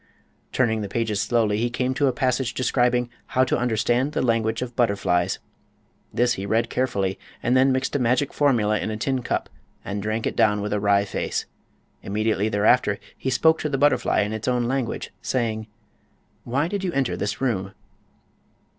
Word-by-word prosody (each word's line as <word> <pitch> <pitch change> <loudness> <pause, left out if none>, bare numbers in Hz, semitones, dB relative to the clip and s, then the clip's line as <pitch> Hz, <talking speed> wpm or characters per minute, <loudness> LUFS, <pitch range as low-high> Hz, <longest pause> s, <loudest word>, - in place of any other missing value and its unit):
Turning 110 -4 +1
the 100 - -4
pages 110 -2 -1
slowly 105 -1 +1
he 120 +1 +1
came 125 +2 -1
to 140 +1 +1
a - - +3
passage 130 -1 0
describing 125 -1 +1 0.3
"How 130 - +6
to - - +1
understand 120 +3 +1
the - - 0
language 115 -1 +1
of 120 -1 -8
butterflies." 95 -5 +1 0.7
This 120 0 +2
he 100 -5 -5
read 115 +3 +1
carefully 100 -7 -1 0.2
and 120 +2 +2
then 130 +1 +5
mixed 130 +1 -1
a - - +2
magic 125 +3 +1
formula 115 -7 +2
in - - -3
a 110 - -3
tin 130 +3 -1
cup - - -2 0.4
and 100 +1 -3
drank 110 +2 -2
it - - -2
down 105 -2 +3
with 105 +1 -2
a 105 - +1
wry 100 0 +3
face. - - -3 0.6
Immediately 110 +1 0
thereafter 105 0 +3 0.2
he 130 - -3
spoke 160 +5 +3
to 150 - -2
the 135 - -1
butterfly 135 -5 +3
in 105 +1 -2
its 110 +2 -5
own 125 -1 +2
language, 130 0 -2
saying: 110 -4 -1 0.8
"Why 140 +6 0
did 200 +1 -3
you 185 - -1
enter 135 -3 0
this 105 0 -3
room?" 100 -7 -1
120 Hz, 180 wpm, -24 LUFS, 105-130 Hz, 0.8 s, How